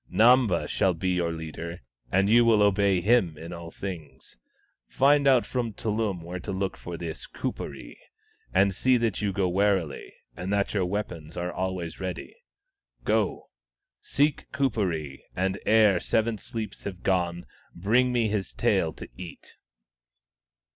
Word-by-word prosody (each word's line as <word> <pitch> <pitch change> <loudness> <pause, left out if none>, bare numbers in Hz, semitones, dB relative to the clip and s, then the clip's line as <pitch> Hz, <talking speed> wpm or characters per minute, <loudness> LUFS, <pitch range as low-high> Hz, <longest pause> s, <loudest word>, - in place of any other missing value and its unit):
" - - -29
Namba 115 -5 +4
shall 95 -2 +1
be 95 +3 -1
your 90 -2 +1
leader, 80 +1 -6 0.3
and 95 +1 +3
you 120 +3 +6
will 110 -3 +5
obey 100 -2 +3
him 95 -7 +3
in 85 +3 -8
all 85 -1 -7
things. 85 -7 -8 0.5
Find 140 +1 +4
out 130 -3 +5
from 120 -4 -2
Tullum 105 -5 -2
where 90 +2 -6
to 100 - -5
look 95 0 -2
for 85 -1 -7
this 80 -2 -6
Kuperee, - - -6 0.5
and 95 +1 +3
see 130 +6 +3
that 115 -4 -1
you 105 -1 0
go 95 -1 0
warily, 95 -5 0 0.2
and 90 +2 -4
that 100 -1 +1
your 100 -4 +1
weapons 90 -6 -4
are 90 0 -2
always 95 -3 -3
ready. 95 -2 -5 0.7
Go; - - 0 0.5
seek 145 0 0
Kuperee, 90 - -1
and 95 +1 -1
ere 105 -4 +5
seven 110 +4 0
sleeps 110 -2 -6
have 95 -2 -6
gone, 90 -2 0 0.3
bring 115 +8 +2
me 120 -2 +2
his 100 -4 -2
tail - - +1
to - - -9
eat 90 -2 -10
95 Hz, 150 wpm, -27 LUFS, 85-110 Hz, 0.7 s, you